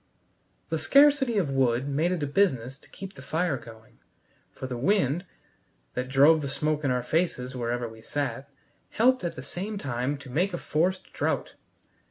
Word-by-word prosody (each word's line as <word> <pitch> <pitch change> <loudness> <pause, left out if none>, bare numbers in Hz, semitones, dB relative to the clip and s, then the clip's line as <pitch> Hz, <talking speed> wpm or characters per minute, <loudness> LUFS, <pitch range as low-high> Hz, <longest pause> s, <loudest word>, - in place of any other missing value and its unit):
The 160 - -1
scarcity 275 - +5
of 170 -8 +1
wood 130 -1 +2
made 155 +5 +1
it 175 -5 -1
a - - +2
business 135 - +1
to - - -21
keep 195 0 -9
the 135 - -12
fire 160 +3 0
going, 115 -2 -13 0.5
for - - -8
the 130 -1 -4
wind, 175 - +1 0.7
that 125 0 -3
drove 145 +4 +6
the 140 - -3
smoke 150 +2 -1
in 140 - +1
our 125 -1 0
faces 130 -3 -1
wherever 120 0 -2
we 110 0 -12
sat, 140 +1 -3 0.4
helped 255 0 +3
at 170 -1 -3
the 130 - -7
same 195 +9 -5
time 135 -3 -2
to 140 -1 -12
make 175 +7 +1
a - - -3
forced 180 +4 -1
draught. - - -1
145 Hz, 180 wpm, -27 LUFS, 130-180 Hz, 0.7 s, drove